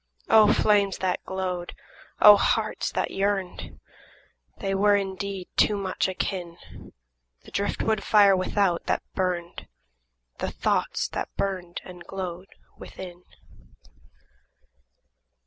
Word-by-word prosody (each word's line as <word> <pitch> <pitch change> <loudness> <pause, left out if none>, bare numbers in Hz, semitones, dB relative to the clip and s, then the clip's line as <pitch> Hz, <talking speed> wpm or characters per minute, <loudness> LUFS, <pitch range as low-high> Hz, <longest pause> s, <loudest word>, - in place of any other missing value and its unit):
O 215 -1 +7
flames 200 -2 +2
that 185 -1 -2
glowed! 185 -2 -4 0.5
O 210 0 +10
hearts 200 - 0
that - - -1
yearned! 195 -2 -2 0.8
They 195 - -2
were 205 +1 +4
indeed 195 -1 -3
too 210 - +4
much 190 -2 -1
akin, 180 -2 -4 0.6
– - - -50
The - - -14
drift 200 0 -2
wood 220 -2 0
fire 205 -2 +5
without 185 -1 0
that - - 0
burned, 180 -2 -3 0.7
The - - -2
thoughts - - -1
that - - -4
burned 185 -3 -3
and 180 -1 -11
glowed 185 0 -6 0.3
within. 180 -1 -10
190 Hz, 110 wpm, -25 LUFS, 180-200 Hz, 0.8 s, O